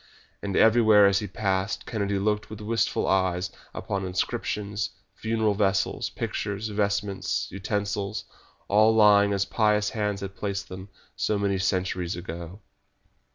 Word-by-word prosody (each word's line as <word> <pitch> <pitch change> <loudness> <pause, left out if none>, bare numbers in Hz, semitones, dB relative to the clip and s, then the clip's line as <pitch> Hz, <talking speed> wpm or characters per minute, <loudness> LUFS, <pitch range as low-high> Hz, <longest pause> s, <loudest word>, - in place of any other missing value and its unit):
And 100 -2 -3
everywhere 110 -2 +6
as 100 0 +4
he 105 - -4
passed 95 -1 -1
Kennedy 100 -3 -1
looked 105 +2 -1
with 110 -1 -8
wistful 115 +1 0
eyes 95 -1 +1 0.2
upon 100 -1 -3
inscriptions, 100 +3 -2 0.2
funeral 110 -1 0
vessels, 100 -1 0
pictures, 105 +2 -3
vestments, 100 -1 -1
utensils, 100 +1 -2 0.4
all 110 +2 +4
lying 105 -2 +6
as 100 -1 +1
pious 105 -2 +1
hands 105 -2 -2
had 100 0 -6
placed 100 -1 -4
them 95 +2 -8 0.3
so 105 - 0
many 100 -1 0
centuries 90 -1 -1
ago. 85 +2 -7
100 Hz, 130 wpm, -26 LUFS, 95-105 Hz, 0.4 s, everywhere